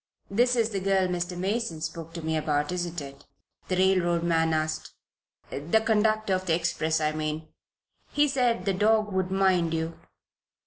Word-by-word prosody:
"This 245 +4 +3
is 230 -1 +1
the 200 - -1
girl 190 -1 +2
Mr. 180 0 -3
Mason 195 -2 -2
spoke 165 +1 -5
to 170 - -5
me 160 0 -1
about, 150 -1 0
isn't 175 -1 -3
it?" 140 0 -10 0.4
the 185 - 0
railroad 180 -2 +2
man 165 -1 +2
asked. 155 0 -2 0.6
"The 165 +10 +1
conductor 215 -2 +2
of 185 0 -1
the 165 - +3
express, 160 -2 0
I 155 -1 +1
mean. 155 0 -4 0.6
He 295 0 +3
said 245 -8 +1
the 195 - +1
dog 210 +1 +2
would 190 -1 0
mind 185 -4 +2
you." 160 +1 -3
180 Hz, 170 wpm, -27 LUFS, 160-200 Hz, 0.6 s, This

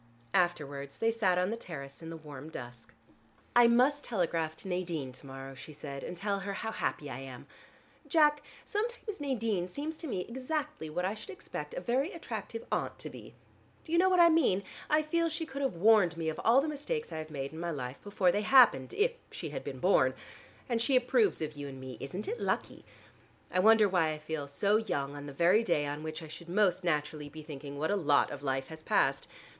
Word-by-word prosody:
Afterwards, 145 -6 0
they 225 0 +2
sat 195 -6 +2
on 180 +3 +1
the - - -1
terrace 140 -11 -8
in 165 - -7
the 165 - -6
warm 150 -1 -9
dusk. 120 -5 -9 0.6
"I 240 -1 +8
must 255 +5 +4
telegraph 165 -7 -1
to 175 - -8
Nadine 170 -7 -2
to 130 +2 -13
morrow," 135 0 -8
she 145 +3 -10
said, 140 -2 -7
"and 175 - -6
tell 200 +1 -1
her 200 +1 -4
how 220 +3 -3
happy 150 - -2
I 130 -2 -5
am. 130 -2 -9 0.6
Jack, 300 -3 +4 0.2
sometimes 430 -3 -3
Nadine 225 -10 0
seems 295 - -4
to 325 - -5
me 195 -9 -2
exactly 265 - -3
what 180 +4 -1
I 195 - 0
should 220 - -10
expect 410 +4 -6
a - - -3
very 265 +8 0
attractive 460 +1 -6
aunt - - -1
to - - -6
be. - - -12 0.5
Do 320 - -10
you 340 - +4
know 375 +1 +5
what 365 -1 +4
I 340 0 +9
mean? 265 - +3 0.3
I 305 0 +4
feel 335 +2 +1
she 320 +1 -3
could 280 -1 -6
have 265 -8 0
warned 185 -2 +5
me 160 -1 -1
of 155 - -4
all 245 +4 +6
the 300 - -2
mistakes 310 - -3
I - - -4
have 155 0 -6
made 140 -1 -5
in 160 - -7
my 170 0 -2
life, 130 -4 -5
before 200 -3 +2
they 205 - 0
happened, 215 - +6
if 455 +4 +3 0.2
she - - -5
had - - -5
been - - -5
born. - - +3 0.5
And 235 -2 0
she 265 +3 +2
approves 315 - +3
of 155 0 -4
you 145 -1 -6
and 135 -1 -8
me; 130 -2 -8
isn't 180 +10 -5
it 470 +3 -3
lucky? - - -2 0.7
I 185 - +1
wonder 220 +2 +7
why 180 -4 +2
I 155 - -2
feel 155 -1 -4
so 200 +9 +2
young 145 -10 -2
on 145 0 -7
the - - -6
very 175 +10 +4
day 160 -8 +1
on 145 +1 -4
which 155 +1 -5
I - - -8
should 170 +2 -10
most 190 -1 +2
naturally 150 -2 -1
be 155 +1 -10
thinking 145 -2 -8
what 155 +5 0
a - - +3
lot 145 -7 +3
of - - -6
life 135 -1 -1
has 160 0 -9
passed. 135 -3 +2
180 Hz, 225 wpm, -31 LUFS, -, 0.7 s, I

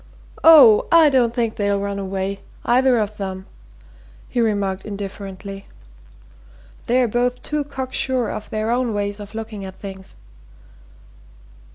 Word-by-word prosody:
"Oh, 280 -10 +8
I 325 -3 +6
don't 245 -3 +3
think 230 -2 -2
they'll 200 -2 0
run 200 0 -3
away 195 0 -3 0.3
either 255 +1 +3
of 210 -1 -3
'em," 190 -1 -5 0.8
he 245 - -1
remarked 200 -4 -1
indifferently. 195 -1 -7 1.2
"They're 250 0 +3
both 245 +2 -1
too 300 -1 -2
cock 265 -2 -6
sure 255 -3 0
of 215 - -7
their 215 +1 -2
own 240 -2 0
ways 205 0 -2
of 205 +1 -10
looking 220 -2 -6
at 190 -1 -8
things." 190 -1 -10
215 Hz, 135 wpm, -21 LUFS, 200-245 Hz, 1.2 s, Oh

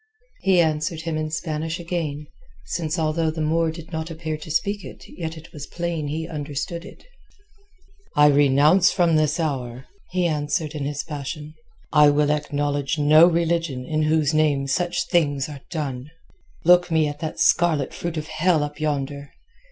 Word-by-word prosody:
He 190 -2 +3
answered 155 0 -1
him 165 -1 -3
in 155 0 -2
Spanish 160 +1 -3
again, 165 -4 -3 0.4
since 155 - -2
although 160 0 0
the 160 +1 -5
Moor 160 +1 +1
did 165 +1 -9
not 160 0 -4
appear 160 -1 -4
to 155 +1 -10
speak 200 +5 -1
it - - -10
yet 165 -2 -6
it 160 - -13
was 145 -1 -8
plain 170 -3 -3
he 160 +2 -3
understood 150 +3 -5
it. - - -14 1.1
"I 150 - +6
renounce 145 +5 +5
from 170 -4 +2
this 155 +1 +1
hour," 130 -5 -3 0.2
he 180 -1 0
answered 150 0 -1
in 145 -3 -4
his 145 0 -3
passion. 150 0 -6 0.4
"I 150 -1 +7
will 145 0 +2
acknowledge 145 -1 -1
no 155 +3 +7
religion 165 -6 0
in 155 +2 -1
whose 155 -1 +2
name 150 -3 +2
such 175 +6 0
things 145 -6 +1
are 145 -3 -9
done. 140 -5 -4 0.6
Look 175 +1 +6
me 160 -2 +2
at 145 0 -6
that 155 -1 -5
scarlet 160 -6 +2
fruit 170 -1 -4
of 155 - -3
hell 160 0 +1
up 145 +1 -6
yonder. 140 -2 -2
155 Hz, 165 wpm, -23 LUFS, 145-165 Hz, 1.1 s, I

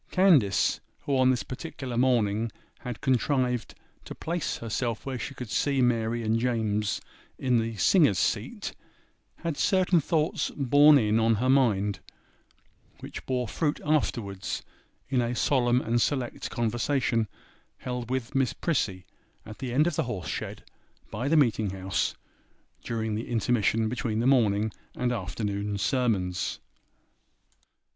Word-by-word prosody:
Candace, 155 - +4 0.2
who 145 -1 -1
on 130 -1 +4
this 125 -6 +1
particular 130 -1 -6
morning 115 -3 +2 0.3
had 125 -3 -6
contrived 125 -2 0 0.3
to - - -8
place 170 -1 -2
herself 115 0 -3
where 130 -2 -3
she 135 +2 -5
could 125 -5 -7
see 140 +7 +1
Mary 115 -2 +1
and 110 +1 +1
James 110 -4 0 0.4
in 125 -3 +2
the 115 0 -2
singers' 140 - +4
seat, - - -1 0.7
had 165 -4 -2
certain 185 -3 +3
thoughts 155 +1 0
'borne 145 +2 +6
in' 110 -3 +2
on 115 0 +3
her 130 +5 +2
mind, 105 -7 +2 1.0
which - - -8
bore 125 -2 -1
fruit 150 +6 -1
afterwards 115 -10 -1 0.4
in 130 -2 +1
a 120 +1 -1
solemn 125 0 +2
and 120 0 0
select 130 -3 -1
conversation 120 0 0 0.5
held 125 -1 -5
with 130 -2 -2
Miss 135 -2 +1
Prissy 100 - -1 0.4
at 110 0 -10
the 130 -3 -4
end 145 +5 +3
of 175 -3 0
the - - +2
horse 105 -7 -4
shed - - -5 0.5
by 120 +6 -3
the 160 +2 +3
meeting 110 -7 +3
house, 95 -1 -2 0.7
during 110 -1 -2
the 110 +3 -4
intermission 115 -1 +1
between 115 -1 -2
the 115 - 0
morning 110 -5 +3 0.2
and 125 0 0
afternoon 100 -1 -3
sermons. 95 -6 0
120 Hz, 135 wpm, -27 LUFS, 110-135 Hz, 1.0 s, borne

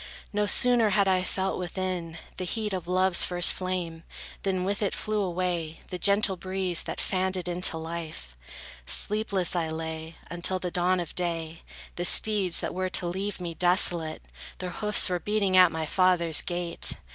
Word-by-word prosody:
No 210 0 0
sooner 240 -1 +4
had 200 0 +2
I 185 -1 +2
felt 190 +1 -3
within, 180 -2 -4 0.2
the 185 - -4
heat 210 +3 -3
Of 180 -2 -5
love's 185 0 +4
first 175 -1 +4
flame, 180 -3 -4 0.4
than 185 -2 -1
with 200 +3 -2
it 200 - -1
flew 215 -1 -2
away 175 -3 -3
The 180 - -5
gentle 200 0 +3
breeze, 185 -1 -2
that - - -6
fanned 190 0 -1
it 180 -1 -5
into 175 -1 -2
life. 160 - -7 0.5
Sleepless 200 - 0
I 165 -2 -1
lay, 160 0 -6
until 175 +2 -1
the 180 -1 -5
dawn 180 +1 +1
of 170 -3 -5
day; 165 -2 -4 0.4
The 175 - -2
steeds, 200 -3 +3
that - - -4
were 185 0 -2
to 180 - 0
leave 190 +3 -4
me 175 -2 -5
desolate, 175 -2 +1 0.3
Their 180 - -5
hoofs 210 +3 +6
were 180 -2 -2
beating 205 -1 0
at 180 -2 +6
my 160 0 -3
father's 170 -1 +2
gate. 175 -1 -3
180 Hz, 170 wpm, -26 LUFS, 170-190 Hz, 0.5 s, hoofs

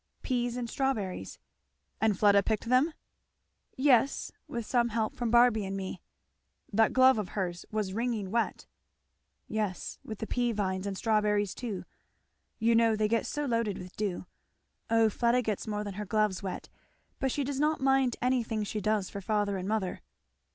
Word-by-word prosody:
"Peas 245 -2 -1
and 245 -1 -3
strawberries." 225 -8 -2 0.6
"And 215 -3 +3
Fleda 200 -1 +5
picked 220 +2 -1
them?" 255 +6 +4 0.9
"Yes 265 -1 +3 0.2
with 235 -2 -4
some 240 0 +2
help 220 -1 -1
from 240 -2 -2
Barby 235 -2 +5
and 195 0 -3
me." 190 -2 -5 0.7
"That 220 +1 +4
glove 260 -2 +5
of 195 -4 -3
hers 175 -4 -3
was 210 -3 -2
wringing 225 -4 -2
wet." 230 0 -1 0.8
"Yes, 210 -4 -3
with 220 - -6
the 220 - -4
pea 240 0 0
vines, 190 -2 -1
and 195 -1 -3
strawberries 210 -3 +1
too; 225 -7 -5 0.7
you 230 +1 +3
know 230 -1 +4
they 215 0 +1
get 230 +1 0
so 295 0 -2
loaded 230 -5 0
with 180 +1 -10
dew. 200 -4 -2 0.6
O 225 -1 +5
Fleda 235 +3 +2
gets 215 -2 -2
more 210 -1 -2
than 205 -1 -5
her 210 +2 -5
gloves 210 -2 +1
wet. 190 -2 -5 0.5
But 265 - 0
she 285 - -1
does 275 0 -3
not 305 +1 +2
mind 265 -2 +3
anything 235 -4 +1
she 210 +1 -3
does 210 -1 +1
for 200 - -7
father 205 0 0
and 185 0 -4
mother." 210 -3 -1
220 Hz, 170 wpm, -30 LUFS, 200-240 Hz, 0.9 s, Fleda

